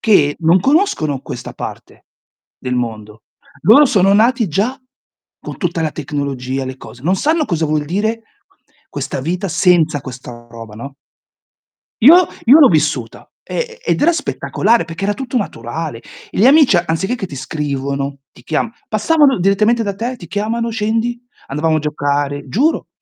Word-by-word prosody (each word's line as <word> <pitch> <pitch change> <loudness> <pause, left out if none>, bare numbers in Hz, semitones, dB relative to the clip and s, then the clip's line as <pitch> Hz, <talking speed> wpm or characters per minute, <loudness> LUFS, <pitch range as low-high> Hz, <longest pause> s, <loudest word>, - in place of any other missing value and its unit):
che 150 -10 +3
non 170 +2 +3
conoscono 220 - +1
questa - - -8
parte - - -9 0.5
del 125 -1 -3
mondo. 110 -3 -5 0.4
Loro 280 +8 +7
sono 195 -6 +3
nati 230 -1 +3
già 220 - -1 0.6
con - - -8
tutta 170 -3 -2
la 155 - 0
tecnologia, 135 -3 -4
le 130 0 -7
cose. 120 - -13
Non 180 +6 +1
sanno 310 - +1
cosa 165 - -1
vuol 150 -1 0
dire 220 +7 -2 0.7
questa - - -4
vita 175 +7 -2
senza 165 -3 +2
questa 125 -2 -10
roba, 115 -2 -10
no. 135 +5 -9 1.1
Io 340 +8 +8 0.2
io 265 +7 +7
l'ho 290 - +8
vissuta, 150 -7 -1
e 475 -1 -5
e - - 0
ed - - -1
era 340 +3 +5
spettacolare, 235 - 0
perché 165 +3 -6
era 205 +1 0
tutto 260 -1 -5
naturale. 145 - -4 0.3
Gli 215 - +3
amici, 280 - +6
anziché 175 +6 -1
che 220 -6 -5
ti 140 - -9
scrivono, 140 0 -3
ti - - -18
chiam 160 +8 -1 0.2
passavano 275 +5 +3
direttamente 210 +5 +2
da 200 -2 -3
te, 235 +6 -4
ti 180 - -11
chiamano, 220 +6 -2
scendi, 225 +2 -1 0.3
andavamo 155 +3 0
a - - +1
giocare, 145 -1 -2
giuro. 275 - 0
175 Hz, 155 wpm, -17 LUFS, 140-230 Hz, 1.1 s, Io